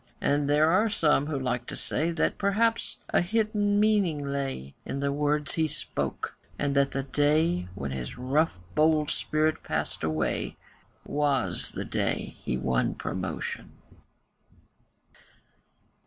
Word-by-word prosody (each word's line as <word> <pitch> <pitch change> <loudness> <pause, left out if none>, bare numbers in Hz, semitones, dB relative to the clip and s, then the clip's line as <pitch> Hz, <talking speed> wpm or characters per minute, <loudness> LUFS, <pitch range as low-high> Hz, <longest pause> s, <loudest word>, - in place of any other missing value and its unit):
And 145 0 +1
there 150 +2 +5
are 210 +5 +4
some 150 -7 +2
who 150 -2 -1
like 125 -2 -2
to - - -5
say 160 +3 -1
That 165 -1 0
perhaps 220 +3 +1
a - - +3
hidden 205 +1 +1
meaning 200 -9 +2
lay 135 - -3
In 135 - -4
the 140 0 0
words 150 +1 0
he 160 -1 +2
spoke, - - -3 0.2
and 140 -1 0
that 140 0 +4
the 135 0 -2
day 145 - +2
When 70 0 -4
his 65 - -5
rough 135 - +1 0.2
bold 155 -1 +3
spirit 155 +1 +1
passed - - -3
away 80 0 -1 0.5
Was 140 -11 0
the - - -4
day - - -1
that - - -25
he 60 - 0
won 65 -1 +1
promotion. - - -4
145 Hz, 140 wpm, -28 LUFS, 135-165 Hz, 0.5 s, there